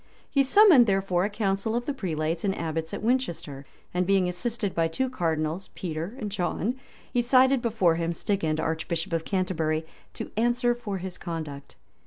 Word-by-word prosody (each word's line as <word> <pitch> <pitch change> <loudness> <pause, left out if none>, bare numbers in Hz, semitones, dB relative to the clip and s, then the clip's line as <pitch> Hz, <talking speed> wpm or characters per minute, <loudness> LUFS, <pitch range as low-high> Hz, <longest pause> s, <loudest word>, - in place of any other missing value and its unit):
He 280 - +2
summoned, 290 - +7
therefore, 195 -2 +1
a - - -1
council 205 +1 -1
of 240 0 -1
the 285 - -1
prelates 165 - -2
and 195 -1 0
abbots 160 0 -3
at - - -5
Winchester; 170 - -1 0.3
and 180 0 0
being 195 -2 +3
assisted 200 +3 -2
by 165 -1 +2
two 255 +11 -2
cardinals, 165 -3 -1
Peter 170 +4 -4
and 210 -4 -4
John, 195 +3 -1 0.4
he 245 - +3
cited 260 +1 +4
before 205 -8 +2
him 170 0 -1
Stigand, 165 -3 -1
archbishop 160 +1 -2
of 165 -1 -1
Canterbury, 165 -5 0 0.3
to - - -5
answer 240 +2 +2
for 225 -5 -5
his 185 -1 -6
conduct. 155 -5 -6
190 Hz, 170 wpm, -27 LUFS, 165-235 Hz, 0.4 s, summoned